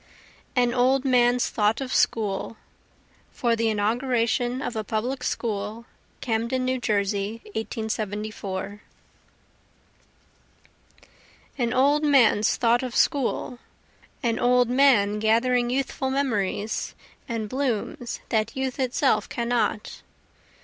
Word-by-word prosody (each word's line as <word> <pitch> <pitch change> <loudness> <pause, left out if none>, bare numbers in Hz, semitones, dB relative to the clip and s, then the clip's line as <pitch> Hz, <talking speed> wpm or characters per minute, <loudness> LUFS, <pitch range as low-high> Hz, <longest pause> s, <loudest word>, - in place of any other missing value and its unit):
An 245 -1 +2
Old 260 +2 +2
Man's 245 -1 +3
Thought 210 +1 +1
of 265 -2 -4
School 215 0 0 0.8
[For 235 -2 +1
the 230 0 +1
Inauguration 240 +3 0
of 245 - -4
a 220 - -2
Public 235 +6 -2
School, 215 0 -3 0.4
Camden, 235 +2 -1
New 255 0 0
Jersey, 205 -1 -1
1874] 210 -3 -4 2.8
An 235 -2 +1
old 285 +4 +3
man's 245 -7 +4
thought 235 0 +2
of 255 -2 -5
school, 255 -2 0 0.6
An 230 -2 0
old 245 0 +3
man 240 -6 +4
gathering 240 +3 +2
youthful 265 +1 -1
memories 220 -6 -1 0.3
and 225 -2 -2
blooms 245 0 -3
that 220 0 0
youth 265 0 -3
itself 260 +1 +1
cannot. 235 -3 -1
235 Hz, 100 wpm, -25 LUFS, 215-255 Hz, 2.8 s, man's